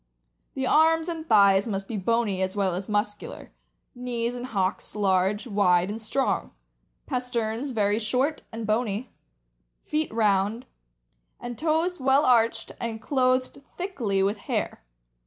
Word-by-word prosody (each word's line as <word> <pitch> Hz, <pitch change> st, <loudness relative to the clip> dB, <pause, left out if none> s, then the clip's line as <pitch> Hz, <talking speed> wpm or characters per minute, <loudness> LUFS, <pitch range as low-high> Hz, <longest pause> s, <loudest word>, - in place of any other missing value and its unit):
The 265 Hz, -, -1 dB
arms 320 Hz, +3 st, +4 dB
and 330 Hz, -2 st, -5 dB
thighs 200 Hz, -1 st, +5 dB
must 195 Hz, -2 st, -3 dB
be 230 Hz, -, -4 dB
bony 210 Hz, -1 st, 0 dB
as 190 Hz, +1 st, -1 dB
well 195 Hz, -3 st, +1 dB
as 185 Hz, +3 st, -5 dB
muscular; 205 Hz, 0 st, -3 dB, 0.4 s
knees 245 Hz, -1 st, -3 dB
and 245 Hz, +1 st, -5 dB
hocks 195 Hz, -3 st, -2 dB
large, 195 Hz, +1 st, +1 dB
wide, 195 Hz, -4 st, +2 dB
and 220 Hz, +2 st, -6 dB
strong; 265 Hz, +5 st, -1 dB, 0.5 s
pasterns 250 Hz, -1 st, -2 dB
very 210 Hz, -3 st, +1 dB
short 255 Hz, +7 st, 0 dB
and 225 Hz, -1 st, -5 dB
bony; 215 Hz, +1 st, -1 dB, 0.7 s
feet 305 Hz, 0 st, -1 dB
round, 215 Hz, +1 st, +1 dB, 0.7 s
and 240 Hz, 0 st, -6 dB
toes 325 Hz, +5 st, 0 dB
well 270 Hz, +2 st, +3 dB
arched 230 Hz, -2 st, +2 dB
and 230 Hz, -1 st, -3 dB
clothed 255 Hz, +2 st, 0 dB, 0.2 s
thickly 240 Hz, -, -1 dB
with 200 Hz, +2 st, 0 dB
hair. -, -, -2 dB
230 Hz, 135 wpm, -26 LUFS, 205-255 Hz, 0.7 s, thighs